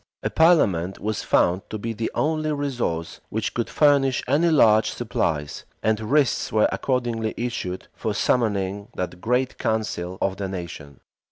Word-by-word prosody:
A - - -1
parliament 100 - +3
was 110 0 -3
found 90 +2 +2
to 110 - -4
be 115 +2 -4
the 115 +1 -2
only 155 0 0
resource 125 - -3
which 110 0 -2
could 120 - -2
furnish 140 -3 +3
any 165 +4 +3
large 110 -8 +5
supplies; 80 -10 -2 0.2
and 110 -1 +2
writs 135 +5 +1
were 110 -1 +4
accordingly 120 -4 -1
issued 100 -6 -4
for - - -3
summoning 100 -4 0
that 90 -1 -4
great 125 +2 0
council 95 -5 -2
of 95 0 -1
the 100 -1 -3
nation. 85 -7 -8
110 Hz, 150 wpm, -24 LUFS, 95-130 Hz, 0.2 s, large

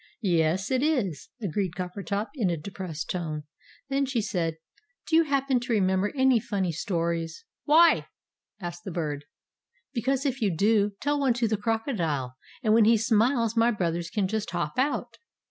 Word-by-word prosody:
"Yes, 175 +2 +1
it 260 -1 +2
is!" 245 - 0
agreed 190 -1 -1
Coppertop, 200 +3 -3
in 230 -11 0
a 170 - -1
depressed 165 -1 -5
tone. 155 -4 -3 0.4
Then 275 0 0
she 255 -3 0
said, 165 -6 -1 0.5
"Do 320 - +2
you 330 0 +6
happen 275 -3 +1
to 240 0 -2
remember 190 -1 +2
any 260 -3 +4
funny 200 -6 -1
stories?" 170 - -2 0.2
"Why?" 320 +2 +5 0.5
asked 175 -2 -6
the - - -5
Bird. 150 -4 -3 0.7
"Because 265 +3 0
if 265 -2 -1
you 210 - +3
do, 205 +1 +3
tell 290 +1 +1
one 265 -4 +2
to 240 -1 +1
the 215 - +1
crocodile, 200 - -1 0.3
and 215 -2 +3
when 225 -1 +6
he 230 +1 +6
smiles 230 +1 +2
my 230 +1 +4
brothers 170 -6 -1
can 200 -1 0
just 215 +1 -2
hop 175 +1 -2
out!" 280 +3 -1
210 Hz, 165 wpm, -27 LUFS, 175-250 Hz, 0.7 s, you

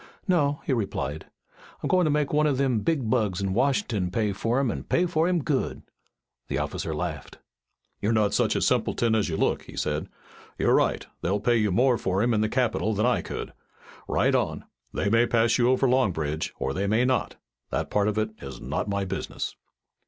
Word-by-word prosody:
"No," 145 -6 +2
he 135 - +1
replied. 95 - -3 0.6
"I'm - - 0
goin' 185 -2 +3
to - - +2
make 150 -1 0
one 150 +1 +3
o' 145 - +2
them 130 -3 +1
big 140 -1 0
bugs 110 -6 +1
in 95 -1 -1
Washin'ton 120 - +1
pay 105 +2 0
fur 115 +6 0
him 135 -4 +1
an' - - -6
pay 175 - +2
fur 165 -1 +1
him 175 -4 +1
good." 135 -2 -1 0.6
The - - -2
officer - - -3
laughed. 75 -2 -5 0.6
"You're 105 - +1
not 110 -2 +2
such - - +2
a - - +1
simpleton 115 -1 +1
as 110 -4 +1
you 80 - -2
look," - - +1
he - - -12
said. 75 0 -2 0.5
"You're - - +3
right. - - +2 0.2
They'll 95 +4 0
pay 120 +3 +2
you 105 -3 +1
more 120 +4 +3
for 95 +2 0
him 120 0 +2
in 105 - +2
the 110 - +1
capital 110 -3 0
than 105 +3 +1
I 125 - +2
could. - - -6 0.5
Ride - - +2
on. - - 0 0.3
They 100 - -1
may 115 +3 +4
pass 115 +1 +2
you 120 0 +4
over 130 +1 +3
Long 125 -4 +3
Bridge 80 -1 -3
or 70 - -2
they 100 +5 -1
may 110 +4 +3
not. 130 -1 0 0.3
That - - -2
part 105 0 +2
of 105 0 -1
it 110 0 0
is 70 -1 -8
not - - -3
my 100 -1 -1
business." 95 0 -4
110 Hz, 210 wpm, -26 LUFS, 100-130 Hz, 0.6 s, may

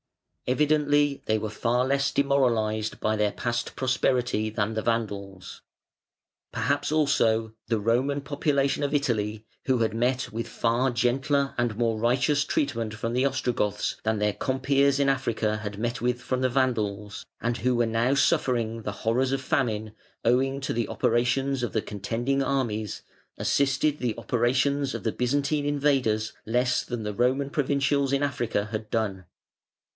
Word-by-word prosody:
Evidently 145 +1 +2
they 110 - +2
were 110 0 -3
far 120 +3 +1
less 140 +1 +1
demoralised 115 -6 +1
by 110 0 +1
their 105 -1 +1
past 120 +2 -3
prosperity 125 -4 +1
than 110 0 -1
the 110 - -1
Vandals. 100 -5 -3 0.9
Perhaps 140 +6 0
also 115 -8 +2
the 115 -2 +1
Roman 125 +7 +1
population 140 -1 0
of 145 +1 0
Italy, 110 -6 -1 0.2
who 130 -2 +3
had 115 -2 0
met 125 +3 0
with 115 +1 -3
far 120 +3 +1
gentler 135 +3 +1
and 120 -3 0
more 115 -2 +1
righteous 125 +5 +2
treatment 115 -7 -1
from 115 +2 -3
the 125 +2 +2
Ostrogoths 125 -6 -1
than 110 0 +1
their 105 0 +1
compeers 140 +2 +1
in 140 - +3
Africa 115 -5 0
had 105 -2 -6
met 120 +2 -2
with 125 0 0
from 125 +1 -2
the 130 - +2
Vandals, 105 -6 -1 0.2
and 120 0 -1
who 125 0 +1
were 120 0 +2
now 115 +4 +1
suffering 125 -7 +1
the 105 - -4
horrors 125 +4 +1
of 135 - 0
famine, 115 -7 -1 0.3
owing 135 +3 +2
to 140 - -2
the 115 0 -1
operations 125 +4 +1
of 120 - -1
the 110 - 0
contending 120 +7 -2
armies, 120 -6 -2 0.3
assisted 140 +2 +1
the 120 -3 -1
operations 130 +3 +1
of - - -5
the - - 0
Byzantine 145 +3 0
invaders 135 -7 +1
less 125 +2 +1
than 120 -2 -5
the 105 0 -3
Roman 130 +5 +1
provincials 140 -1 +1
in 140 +1 +1
Africa 120 -7 -1
had 110 -1 -4
done. 100 -5 -2
125 Hz, 155 wpm, -26 LUFS, 110-140 Hz, 0.9 s, who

